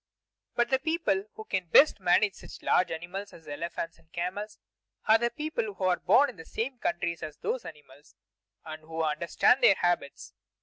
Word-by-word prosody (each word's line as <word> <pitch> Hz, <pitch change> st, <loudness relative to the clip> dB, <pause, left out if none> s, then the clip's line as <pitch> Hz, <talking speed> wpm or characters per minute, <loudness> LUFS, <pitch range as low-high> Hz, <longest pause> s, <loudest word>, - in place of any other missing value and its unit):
But 240 Hz, +1 st, +1 dB
the 265 Hz, -, +3 dB
people 295 Hz, -, 0 dB
who 220 Hz, -, -8 dB
can 190 Hz, -4 st, -2 dB
best 280 Hz, -, +6 dB
manage 195 Hz, +2 st, +3 dB
such -, -, -12 dB
large 185 Hz, -, +3 dB
animals 180 Hz, +5 st, -6 dB
as 165 Hz, -, -15 dB
elephants 165 Hz, +2 st, -5 dB
and 160 Hz, -, -27 dB
camels 190 Hz, +5 st, -4 dB, 0.5 s
are 220 Hz, +1 st, +6 dB
the 235 Hz, +1 st, +1 dB
people 235 Hz, -6 st, -4 dB
who 195 Hz, -, -6 dB
are 180 Hz, -2 st, +2 dB
born 280 Hz, +10 st, +5 dB
in 225 Hz, -, -22 dB
the 165 Hz, -, -9 dB
same 240 Hz, +8 st, -4 dB
countries 170 Hz, -3 st, -2 dB
as 155 Hz, -1 st, -7 dB
those 255 Hz, -, -3 dB
animals 145 Hz, -2 st, -14 dB, 0.5 s
and 155 Hz, 0 st, -8 dB
who 160 Hz, +1 st, -4 dB
understand 165 Hz, -, +2 dB
their 195 Hz, -, +7 dB
habits. 175 Hz, -6 st, -2 dB
180 Hz, 180 wpm, -28 LUFS, 165-220 Hz, 0.5 s, their